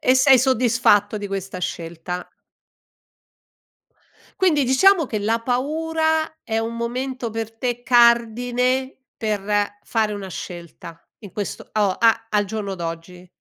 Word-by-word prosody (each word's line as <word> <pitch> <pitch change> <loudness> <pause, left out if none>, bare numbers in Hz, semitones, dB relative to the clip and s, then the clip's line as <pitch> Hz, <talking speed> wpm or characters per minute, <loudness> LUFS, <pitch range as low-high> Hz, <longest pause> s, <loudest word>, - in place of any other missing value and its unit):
E 255 - +4
sei 260 0 +6
soddisfatto 230 -5 +3
di 205 - -5
questa 195 -1 -5
scelta? 170 0 -5 2.1
Quindi, 315 -7 +3
diciamo 325 +7 +4
che 220 - -3
la 225 +3 0
paura 315 +5 -1
è 225 -1 -1
un 225 +1 -3
momento 250 +1 -3
per 225 0 -5
te 245 0 -3
cardine 245 +2 +3 0.2
per 215 -3 -2 0.4
fare 220 -2 0
una 200 -2 -6
scelta 170 -2 -9 0.2
in 205 -5 -11
questo 205 -2 -6
o 210 -2 +2
a 225 -1 +3
al 210 -2 +1
giorno 200 -1 -4
d'oggi. 170 +1 -7
230 Hz, 125 wpm, -22 LUFS, 205-255 Hz, 2.1 s, sei